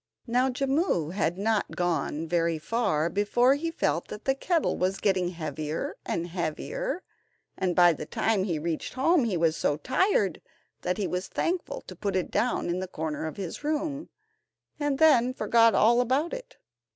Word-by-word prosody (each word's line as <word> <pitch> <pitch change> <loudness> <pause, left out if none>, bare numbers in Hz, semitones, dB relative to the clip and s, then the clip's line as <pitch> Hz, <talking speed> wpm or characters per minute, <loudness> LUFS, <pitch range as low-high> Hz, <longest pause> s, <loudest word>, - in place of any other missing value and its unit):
Now 250 +2 +2
Jimmu 270 - 0
had 185 -3 0
not 215 +1 0
gone 165 -2 -1
very 170 -1 +1
far 160 -3 0
before 210 +7 +3
he 315 +4 -2
felt 165 - -1
that 210 - -9
the 270 - +3
kettle 330 +4 0
was 185 +1 0
getting 190 -3 +1
heavier 155 -2 -4
and 170 - -1
heavier, 270 - -3 0.5
and 185 -2 -1
by 175 -1 +6
the 150 0 -7
time 210 +1 +1
he 170 -5 -1
reached 160 +6 -3
home 285 +1 +3
he 200 -6 0
was 165 -1 +2
so 145 - 0
tired 255 - +1 0.4
that 180 - -1
he 205 - -1
was 180 +1 -3
thankful 350 +1 -2
to - - -11
put 200 -2 -2
it 185 - -1
down 245 +2 0
in 175 +1 -1
the 185 - -4
corner 160 -2 -4
of 155 - -7
his 190 - -6
room, 300 0 -2 0.7
and 290 -2 0
then 255 -5 +4
forgot 230 -4 +4
all 235 +3 +5
about 265 +7 0
it. - - -8
200 Hz, 175 wpm, -27 LUFS, 170-270 Hz, 0.7 s, by